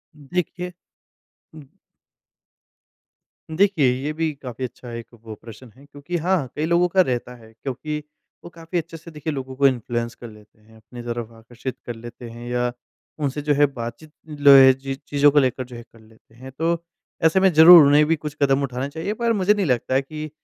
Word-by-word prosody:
देखिए, 180 +4 -4 0.8
उम 155 -3 -12 1.9
देखिए, 185 -9 +3
ये 150 - -2
भी 160 0 -1
काफ़ी 130 -2 -8
अच्छा 125 0 -10
एक 115 0 -7 0.2
वो 110 -1 -8
प्रश्न 115 +1 -13
है, 140 +2 -18
क्योंकि 145 +5 -6
हाँ, 175 -4 0
कई 150 - -1
लोगों 170 +2 +2
का 185 +2 +3
रहता 125 -5 -2
है, 110 -2 -17
क्योंकि 150 +3 -4 0.5
वो 175 - -10
काफ़ी 165 +1 -6
अच्छे 165 0 -5
से 170 +1 -13
देखिए, 150 0 -5
लोगों 130 -1 -6
को 140 +1 +4
इन्फ्लुएंस 120 -2 -2
कर 120 - -10
लेते 105 0 -19
हैं, 110 +1 -21
अपनी 110 +3 -12
तरफ 120 -1 -5
आकर्षित 120 +3 -8
कर 120 - -5
लेते 120 +1 -10
हैं 120 +1 -9
या 125 0 -1 0.5
उनसे 145 0 -2
जो 150 0 +1
है 145 +1 +4
बातचीत 130 +2 -7 0.2
लो 145 -2 +4
ए 130 -1 +8
जी, 135 +1 -6
चीज़ों 145 0 +2
को 150 - +4
लेकर 130 -1 0
जो 125 0 -12
है 120 - -9
कर 115 - -22
लेते 110 0 -23
हैं। 130 +2 -11
तो 170 +1 -1 0.4
ऐसे 160 +4 +4
में 190 0 +4
ज़रूर, 160 0 +9
उन्हें 150 +1 +5
भी 165 - +2
कुछ 150 -1 -7
कदम 140 0 +2
उठाने 130 +1 -3
चाहिए 160 +7 -4
पर 230 -1 +2
मुझे 205 0 +3
नहीं 205 -2 -1
लगता 125 -2 0
है 135 - +3
कि 155 +2 -8
140 Hz, 200 wpm, -22 LUFS, 120-160 Hz, 1.9 s, ज़रूर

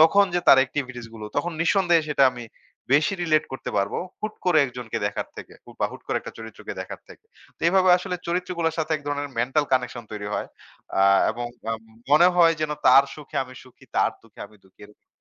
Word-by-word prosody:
তখন 200 +6 +6
যে 175 - +2
তার 135 - +9
এক্টিভিটিস 125 -3 -5
গুলো, 110 -1 -7
তখন 175 - -1
নিঃসন্দেহে 170 -2 +3
সেটা 140 -2 +4
আমি 120 -1 -8 0.5
বেশি 150 +7 +3
রিলেট 155 -3 +2
করতে 130 - -5
পারব। 100 +1 -1 0.3
হুট 215 0 -4
করে 180 -4 +4
একজনকে 125 -3 -5
দেখার 100 - -4
থেকে - - -10
হু - - -14
বা - - +3
হুট - - -11
করে - - -1
একটা - - -9
চরিত্রকে 110 -1 -8
দেখার - - -7
থেকে। - - -16 0.3
তো - - -39
এভাবে 185 +1 +4
আসলে 180 0 -4
চরিত্রগুলোর 170 -2 -1
সাথে 160 0 -1
এক 150 - -4
ধরনের 145 0 -2
মেন্টাল 135 +5 +1
কানেকশন 125 -2 0
তৈরি 105 -1 -5
হয়। - - -3 0.5
আ - - +5 0.3
এবং 120 +2 -4 0.2
আম 115 0 -3 0.3
মনে 160 +5 +7
হয় 165 -2 +6
যেন 155 -1 -1 0.2
তার 135 +2 +8
সুখে 150 0 -10
আমি 130 0 -13
সুখী, 130 - -19
তার - - +3
দুঃখে 115 -2 -18
আমি 105 +1 -21
দুঃখী 95 - -25
এরকম। 105 - -24
145 Hz, 205 wpm, -24 LUFS, 120-170 Hz, 0.5 s, তার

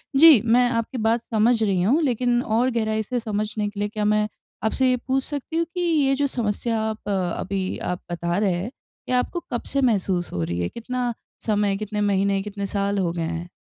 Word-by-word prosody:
जी, 295 -5 +9
मैं 245 +2 +4
आपकी 230 +2 -2
बात 225 +1 +1
समझ 225 +3 +4
रही 190 -4 +1
हूँ, 265 - +3
लेकिन 245 -2 +1
और 235 +3 +2
गहराई 220 -1 0
से 245 +3 -2
समझने 210 -1 -2
के 205 0 -9
लिए 205 0 0
क्या 210 0 -2
मैं 210 0 +2 0.4
आपसे 255 +4 +2
ये 250 - +2
पूछ 265 0 +1
सकती 295 +2 -4
हूँ 335 - +2
कि 355 - -1
ये 300 -6 +2
जो 285 +1 +1
समस्या 230 -2 -1
आप 220 -1 -4
अभी 190 0 -2 0.2
आप 180 - -7
बता 170 +1 -1
रहे 200 -3 +2
हैं, 185 +7 -3 0.4
ये 255 - +2
आपको 250 +8 0
कब 240 - -2
से 275 - +3
महसूस 190 -7 +1
हो 85 - -1
रही 85 +1 -2
है? 85 - -1
कितना 245 0 -3 0.3
समय, 205 -2 +1
कितने 210 0 -3
महीने, 200 -1 +2
कितने 200 -1 -5
साल 200 0 -1
हो 175 -3 +1
गए 170 - -3
हैं? 170 +1 -4
215 Hz, 210 wpm, -23 LUFS, 200-245 Hz, 0.4 s, जी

